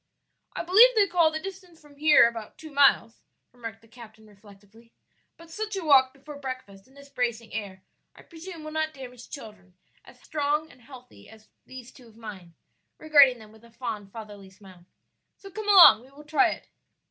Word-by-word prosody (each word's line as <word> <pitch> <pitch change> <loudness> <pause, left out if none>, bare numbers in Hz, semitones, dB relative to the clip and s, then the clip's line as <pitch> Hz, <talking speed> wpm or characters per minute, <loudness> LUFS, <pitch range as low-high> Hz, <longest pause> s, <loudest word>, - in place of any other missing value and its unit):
"I - - -4
believe 445 +8 +6
they 420 -2 +4
call 340 -3 +2
the 315 0 -5
distance 365 -2 -11
from 295 -1 -20
here 300 -5 +5
about 225 -2 -8
two 315 -1 -12
miles," 275 -5 +2 0.3
remarked 230 -2 -10
the - - -21
captain 220 -2 -16
reflectively; 205 +2 -20 0.5
"but 335 0 -16
such 430 +3 -5
a 380 -4 -5
walk 265 -3 +5
before 280 +1 -12
breakfast 255 -8 -9
in 265 - -25
this 280 0 -15
bracing 235 -4 -4
air 200 -3 -7 0.3
I - - -17
presume 335 -1 -11
will 310 - -8
not 315 0 -3
damage 250 -2 -12
children 210 -9 -12 0.3
as - - -19
strong 300 0 -3
and 250 - -21
healthy 250 0 -16
as 220 -1 -19 0.2
these 255 -2 -12
two 250 -3 -18
of 225 -1 -21
mine," 190 -7 -11 0.4
regarding 285 -5 +5
them 215 -2 -16
with 220 +1 -20
a 235 - -18
fond, 225 -4 -7
fatherly 205 -3 -11
smile. 190 -3 -18 0.5
"So 390 - -14
come 430 +1 -6
along, 355 - +8
we 255 - -19
will 290 +2 -16
try 320 +4 +2
it." - - -8
255 Hz, 190 wpm, -25 LUFS, 220-310 Hz, 0.5 s, along